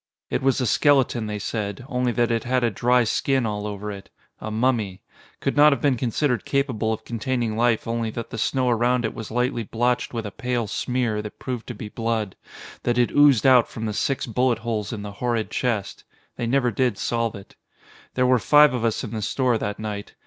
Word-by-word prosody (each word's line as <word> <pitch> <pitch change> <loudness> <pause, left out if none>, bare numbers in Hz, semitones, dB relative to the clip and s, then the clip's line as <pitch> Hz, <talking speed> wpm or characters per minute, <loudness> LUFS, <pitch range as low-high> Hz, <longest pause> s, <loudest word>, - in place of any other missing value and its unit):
It - - 0
was 135 0 +2
a 125 - 0
skeleton, 130 -2 +3
they 105 0 -3
said, 105 +2 -4
only 125 -3 0
that 120 0 +1
it 115 -1 0
had 125 0 0
a 120 - +2
dry 125 +4 +3
skin 130 +3 +1
all 105 -1 -3
over 105 0 -5
it. 100 -1 -10 0.3
A 110 - -5
mummy. 110 -4 0 0.4
Could 135 - -1
not 150 +1 +7
have 140 - +1
been 140 +1 +2
considered 125 -1 0
capable 130 -6 0
of 110 - -4
containing 120 -1 -2
life 115 -1 +1
only 115 -1 -1
that 115 +1 -6
the 115 - -5
snow 130 +3 +1
around 120 +1 +2
it 110 - -2
was 110 - -7
lightly 125 +1 0
blotched 120 +3 -1
with 115 -2 -4
a 105 - -5
pale 125 -3 -2
smear 115 0 -1
that 105 0 -9
proved 125 -3 -5
to 120 - -6
be 105 - -7
blood, 115 -2 -2 0.5
that 120 0 0
had 120 -1 +2
oozed 145 -6 +5
out 130 -3 +6
from 110 - -5
the 105 - -2
six 135 +6 -1
bullet 125 0 +1
holes 110 -3 -2
in 105 -3 -5
the 105 - -6
horrid 120 -3 -1
chest. 115 -6 -2 0.3
They 120 - -3
never 125 0 +2
did 125 +2 0
solve 115 -2 -1
it. 100 -1 -12 0.6
There 125 - +2
were 125 -1 +4
five 150 +3 +6
of 125 -2 -2
us 115 -2 0
in - - -6
the 110 -2 -3
store 125 +1 +1
that 105 -1 -3
night. 105 -1 -6
120 Hz, 215 wpm, -23 LUFS, 110-125 Hz, 0.6 s, not